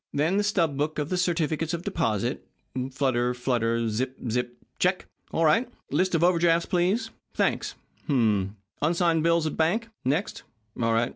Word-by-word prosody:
Then 160 +7 +1
the 205 - +2
stub 170 -9 +1
book 150 +2 -1
of 150 0 -2
the 185 - 0
certificates 165 -2 0
of 170 - -7
deposit. 125 - -1 0.5
Flutter 125 -3 +1
flutter 115 -2 0
zip 125 +4 -2
zip 120 +1 -2 0.2
check! 180 +1 +1 0.3
All 165 - +2
right. 225 +11 +3 0.2
List 185 -1 +2
of 165 - +2
over 175 -1 +4
drafts, 170 0 +3
please. 185 +5 +1 0.2
Thanks. - - 0 0.3
H'm - - -1 0.4
m. - - -33 0.2
Unsigned 165 +1 +2
bills 170 0 +3
of 155 - 0
the - - -9
bank, 215 +9 +1
next. 145 +9 -1 0.4
All 115 0 +2
right. 115 +2 +2
160 Hz, 170 wpm, -26 LUFS, 130-175 Hz, 0.5 s, over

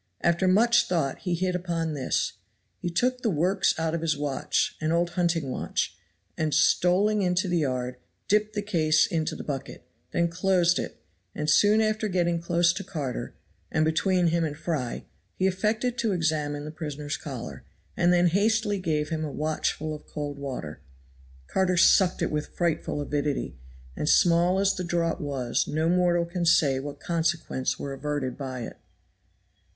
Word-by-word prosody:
After 170 +2 +2
much 230 +6 +4
thought 160 -7 -1
he 180 -2 -1
hit 180 +1 -1
upon 170 -3 -2
this; 140 -3 -1 0.5
he 175 - -3
took 250 +9 0
the 230 - +1
works 185 +3 +2
out 160 0 -1
of 170 - -2
his 160 -3 0
watch 145 -2 -1
an 155 0 0
old 170 +1 +1
hunting 170 -6 0
watch 90 - -2 0.4
and 155 -3 0
stolling 195 +6 +3
into 185 +1 +1
the 175 -1 +1
yard, 125 -3 -2 0.3
dipped 210 +1 +1
the 205 - -1
case 160 -6 +3
into 160 -2 -2
the - - -7
bucket, 135 -2 -6 0.2
then 170 - +1
closed 180 0 +2
it; - - -6 0.3
and 150 0 0
soon 210 +5 +5
after 215 0 0
getting 175 -3 0
close 170 0 +2
to - - -5
Carter, 150 -9 -5 0.4
and 155 - +2
between 175 +2 +2
him 170 0 +1
and 150 -2 -3
Fry, 155 -7 -3 0.3
he 190 - 0
affected 220 +6 0
to 220 -4 +1
examine 150 -4 -1
the 150 - -6
prisoner's 150 -2 -5
collar, 115 - -7 0.3
and 175 0 +3
then 175 0 +4
hastily 205 +3 +2
gave 155 -4 -1
him 160 -1 -2
a 150 - -3
watchful 155 +1 -2
of 150 - -10
cold 145 -2 -5
water. 125 - -6 0.6
Carter 185 - +1
sucked 185 +1 +4
it - - -1
with 150 0 -2
frightful 170 -3 -1
avidity, 145 - -2 0.4
and 150 - -1
small 175 +2 +4
as 195 0 +3
the 180 - -4
draught 170 0 -1
was 135 -5 -1
no 155 +2 0
mortal 175 -1 +3
can 175 +1 -3
say 145 -5 +4
what 145 +1 -7
consequences 165 -5 -1
were 140 - -5
averted 135 -2 -3
by 130 -3 -5
it. 115 - -7
165 Hz, 170 wpm, -26 LUFS, 150-180 Hz, 0.6 s, soon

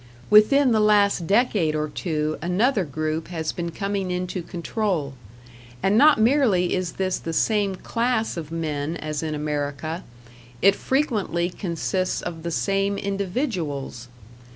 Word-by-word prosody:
Within 250 +6 +6
the 220 - +3
last 205 -5 +3
decade 200 -7 +2
or 155 0 -1
two 155 0 -2
another 195 +6 +1
group 155 +2 -3
has 160 -3 -3
been 170 -1 -4
coming 195 +2 -3
into 180 0 -3
control; 170 -4 -2 0.7
and 195 +2 +3
not 290 +2 +6
merely 220 -7 +3
is 185 -3 -2
this 185 -1 -1
the 165 - -5
same 205 +1 +1
class 230 +2 -1
of 160 -3 -6
men 155 -1 -3
as 155 -1 -4
in 155 -1 -3
America, 150 +2 -3 0.6
it 195 +6 +5
frequently 210 - 0
consists 185 +1 -2
of 165 -2 -5
the 170 - -4
same 195 +3 0
individuals. 185 - -3
180 Hz, 135 wpm, -24 LUFS, 160-210 Hz, 0.7 s, Within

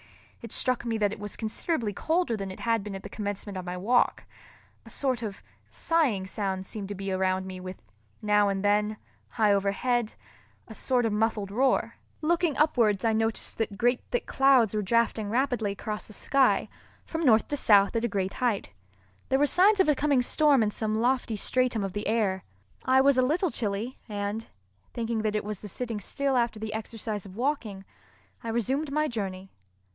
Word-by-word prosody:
It 230 - -9
struck 255 -2 +1
me 230 -2 -1
that 205 -1 +1
it - - -9
was 205 0 -6
considerably 225 0 -2
colder 320 - 0
than 195 -2 -5
it 185 - -9
had 230 -3 +1
been 205 -1 -6
at 195 - -8
the 205 - -8
commencement 205 -1 -5
of 185 -1 -5
my 180 0 -4
walk—a 235 +7 -2
sort 260 -4 -1
of 210 -4 -6 0.3
sighing 275 - +1
sound 190 0 -3
seemed 200 0 -6
to 205 - -4
be 195 0 -4
around 185 0 0
me 185 -1 -7
with, 185 0 -8 0.4
now 210 -1 +3
and 195 0 -2
then, 210 +1 +2 0.3
high 215 -3 +3
overhead, 215 +4 0 0.5
a 225 - -9
sort 245 +1 0
of 220 - 0
muffled 210 -2 0
roar. 260 +5 +1 0.3
Looking 335 -2 +1
upwards 235 -10 +2
I 225 - +3
noticed 225 +1 -1
that 215 -3 -2
great 245 +3 +2
thick 245 - -1
clouds 265 -6 +4
were 215 - 0
drafting 220 0 +1
rapidly 240 -3 0
across 210 +1 -5
the 215 - -11
sky 270 +4 +2 0.4
from 325 - -4
north 230 -8 +4
to 290 - 0
south 205 -6 +4
at 230 - 0
a - - +2
great 195 -3 -2
height. 240 -6 -1 0.6
There 265 - +3
were 290 - +4
signs 390 +7 +4
of 380 - +4
a 300 - +5
coming 280 -2 +2
storm 285 -2 +3
in 210 - 0
some 215 0 -2
lofty 245 -1 +1
stratum 245 0 0
of 195 -2 -4
the 205 0 -3
air. 205 -4 0 0.4
I 260 +1 +4
was 275 -1 +4
a - - +6
little 315 +7 +1
chilly, 215 +3 -3
and, 205 +2 -3 0.5
thinking 230 -1 -1
that 215 -1 -1
it 210 - 0
was 210 -2 -4
the 210 - -8
sitting 230 +2 -4
still 275 +7 -1
after 235 -3 +1
the 215 0 -4
exercise 220 -2 -5
of 185 - -12
walking, 225 -6 -2 0.6
I 230 - -4
resumed 265 +6 -1
my 305 +1 +1
journey. 195 -6 -5
220 Hz, 190 wpm, -27 LUFS, 205-255 Hz, 0.6 s, a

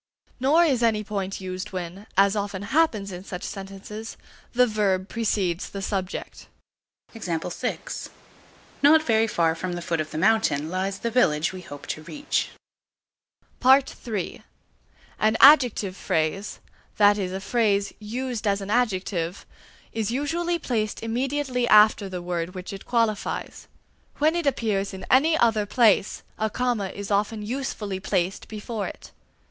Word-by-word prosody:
Nor 295 +7 +4
is 265 -7 +1
any 220 -2 +2
point 195 -2 -4
used 185 +2 -6
when, 185 +3 -6
as 195 +1 +5
often 200 -1 -3
happens 215 -6 +1
in 180 0 -7
such 180 -2 -7
sentences, 195 +3 -7 0.3
the 250 +1 +4
verb 200 -4 0
precedes 200 -6 -1
the 200 - -6
subject. 190 -2 -4 2.3
Not 310 +2 +6
very 225 -4 +3
far 165 -6 +2
from 175 +2 -4
the 175 - -4
foot 165 -2 -1
of 155 - -5
the - - -6
mountain 165 -6 +2
lies 190 +1 -2
the 235 +3 -3
village 160 -10 +2
we 185 - -7
hope 145 -5 -10
to 155 - -4
reach. 290 - -2 1.1
(3) 255 -6 +2 0.8
An 220 +1 +3
adjective 250 -9 +6
phrase, 165 +4 -1 0.4
that 205 0 +5
is 185 -2 -2
a 190 - -3
phrase 205 -1 +1
used 235 +1 -4
as 200 0 +2
an 200 +1 -5
adjective, 190 -6 -1 0.5
is 220 -2 -1
usually 330 +7 -1
placed 220 -10 -2
immediately 250 +1 -1
after 210 -2 +6
the 180 -2 -5
word 175 +1 -3
which 185 +1 -6
it 195 - -9
qualifies; 230 -4 -1 0.5
when 310 +3 +3
it 340 -4 -1
appears 205 -7 0
in 190 - -8
any 315 +5 +5
other 220 -5 +2
place, 215 -3 +3 0.2
a 220 0 +1
comma 240 -3 -1
is 200 +2 -7
often 210 +2 0
usefully 215 -5 -3
placed 190 -1 -1
before 215 0 -4
it. - - -10
210 Hz, 140 wpm, -25 LUFS, 190-240 Hz, 2.3 s, Not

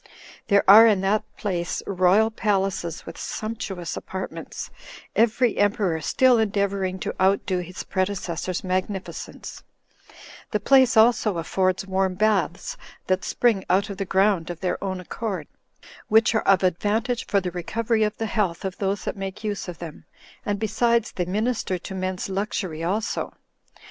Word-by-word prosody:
There 200 -1 +3
are 220 +4 +10
in 205 -4 +3
that 200 +2 +1
place 180 -5 -2
royal 195 +3 +3
palaces, 195 -6 -1
with 165 - -9
sumptuous 210 -6 -4
apartments, 190 0 -6 0.4
every 230 +1 +2
emperor 200 -6 +1
still 255 - +4
endeavoring 200 -3 0
to - - -2
outdo 190 -1 +2
his 180 +1 -6
predecessor's 185 -2 -2
magnificence; 185 +1 -4 0.9
the 210 - 0
place 260 +2 +4
also 220 -4 +4
affords 185 +3 0
warm 190 -1 0
baths, 200 -3 0 0.3
that 185 0 0
spring 225 -6 +1
out 195 +3 +2
of 195 - -7
the 195 - -2
ground 190 -3 +2
of 175 -2 -5
their 180 +1 -2
own 190 -1 -2
accord, 185 -2 -4 0.6
which 225 0 +4
are 220 - 0
of 195 -2 +5
advantage 215 +7 0
for 200 - +2
the 180 -2 -4
recovery 220 +6 -1
of 210 0 0
the 225 - -2
health 200 -5 -1
of 190 0 -4
those 195 0 -1
that - - -2
make 195 +2 -6
use 205 -3 -3
of 175 -2 -6
them; 165 -3 -9 0.4
and, 205 -1 -1
besides, 225 +2 +1
they 180 - -2
minister 210 0 -1
to 185 +2 -8
men's 185 -1 -3
luxury 190 -4 -3
also. 205 +5 -2
195 Hz, 150 wpm, -24 LUFS, 185-215 Hz, 0.9 s, are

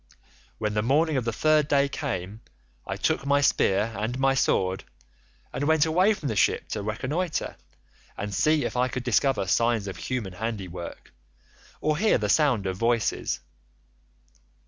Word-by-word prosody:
When 105 -1 -2
the 105 - +1
morning 150 +7 +2
of 130 -3 -1
the 115 - 0
third 155 +4 +2
day 140 -1 +3
came 110 - -4 0.5
I - - -3
took - - 0
my 140 0 +3
spear 110 -5 +2
and 115 +4 -3
my 135 0 +3
sword, 95 -7 +1 0.7
and 145 - -2
went 160 0 +4
away 185 +7 +3
from 150 - -5
the 110 - -2
ship 95 - +2
to 105 - -3
reconnoitre, 140 - -2 0.6
and 105 0 -4
see 155 +7 +2
if - - -4
I 125 +1 +2
could 125 -1 -4
discover 125 -2 +1
signs 115 +3 +1
of 95 - -6
human 120 -8 -4
handiwork, 95 -4 -6 0.7
or 155 0 0
hear 215 +2 +3
the 105 -3 -2
sound 125 -7 +3
of 95 -1 -2
voices. 115 +1 0
125 Hz, 160 wpm, -26 LUFS, 105-145 Hz, 0.7 s, went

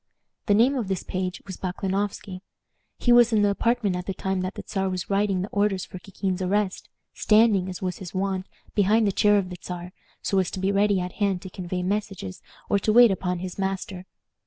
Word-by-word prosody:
The 205 - +5
name 240 +6 +5
of 245 -7 -2
this 190 -2 -2
page 185 -1 -4
was 190 -2 -7
Baklanoffsky. 190 +1 -3 0.6
He 240 - +2
was 240 -1 +7
in 215 -2 +3
the 205 - +4
apartment 225 -2 +1
at 180 0 -5
the 195 - -2
time 190 0 -1
that 185 +1 -4
the - - -6
Czar 195 -1 -1
was 185 +1 -4
writing 195 -2 +1
the - - -3
order 205 -1 +1
for 185 0 -7
Kikin's 190 -1 -3
arrest, 195 +1 -1 0.2
standing, 210 -4 +4
as 185 0 -6
was 180 -1 -3
his 185 -3 -7
wont, 190 0 -2 0.3
behind 215 +2 +3
the 200 - +2
chair 205 +2 +4
of 185 -2 -1
the 180 - -6
Czar, 180 0 -6 0.3
so 195 - +2
as 185 - +1
to - - -6
be 190 +1 +1
ready 200 -1 +3
at 180 0 -3
hand 195 -3 +1
to 190 - -8
convey 180 0 -4
messages 195 -1 -3 0.3
or 200 - +2
to 215 - +1
wait 240 0 +7
upon 180 -1 -1
his 185 +1 -7
master. 190 -1 -3
195 Hz, 215 wpm, -25 LUFS, 185-205 Hz, 0.6 s, was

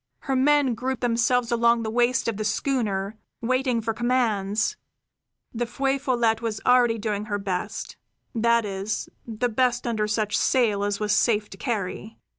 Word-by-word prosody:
Her 270 - -1
men 280 -1 +3
grouped 255 +2 -3
themselves 240 0 +1
along 235 0 +3
the 220 - -3
waist 240 +2 +2
of 225 -3 -1
the 215 - -2
schooner, 215 -3 -1 0.2
waiting 255 0 0
for 225 0 -2
commands. 225 - 0 0.8
The 240 0 -2
Feu 270 +3 -1
Follette 235 -4 +1
was 220 -2 -3
already 245 -2 +4
doing 210 -1 -2
her 205 -1 -2
best; 195 +1 -4 0.4
that 235 -1 +2
is, 200 +1 -3 0.2
the 230 +2 -1
best 245 +1 +1
under 220 -3 0
such 210 0 0
sail 220 -6 +2
as 205 0 -1
was 210 -1 +1
safe 210 -1 +2
to 195 - -10
carry. 215 -1 -4
230 Hz, 160 wpm, -25 LUFS, 210-245 Hz, 0.8 s, already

